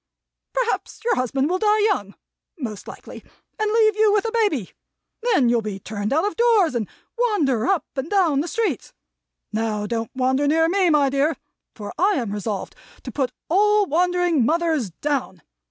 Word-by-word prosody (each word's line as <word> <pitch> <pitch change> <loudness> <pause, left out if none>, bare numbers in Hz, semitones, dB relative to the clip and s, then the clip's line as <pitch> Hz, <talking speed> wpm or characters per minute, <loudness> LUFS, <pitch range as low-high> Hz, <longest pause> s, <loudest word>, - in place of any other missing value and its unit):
Perhaps - - -2
your 475 - +3
husband 265 +2 0
will 365 +3 0
die 425 +1 +3
young 370 - 0 0.4
(most 220 - -6
likely) - - -10 0.4
and 430 -1 +1
leave 435 -1 +4
you 430 -1 +4
with 415 +1 +2
a 455 - -1
baby. 410 - 0 0.5
Then 425 - +3
you'll 235 -1 +2
be 210 -2 -5
turned 205 +1 -4
out 320 +6 +2
of 415 - -2
doors, 450 - +3
and 230 -4 -2 0.3
wander 300 - +1
up 390 -4 +1
and 270 +3 -3
down 355 -9 +2
the 330 - -4
streets. 370 - -2 0.6
Now 215 -1 -1
don't 225 0 -3
wander 260 +2 +1
near 325 +2 +3
me, 370 +1 +2
my 290 -3 +3
dear, 280 +2 +1 0.4
for 205 -2 -7
I 390 +4 +4
am 235 -9 -2
resolved 205 -1 -4 0.3
to - - -6
Put 265 -4 -1 0.2
all 415 +4 +3
wandering 355 -3 +1
mothers 315 - +1
Down. 220 - -3
310 Hz, 170 wpm, -22 LUFS, -, 0.6 s, leave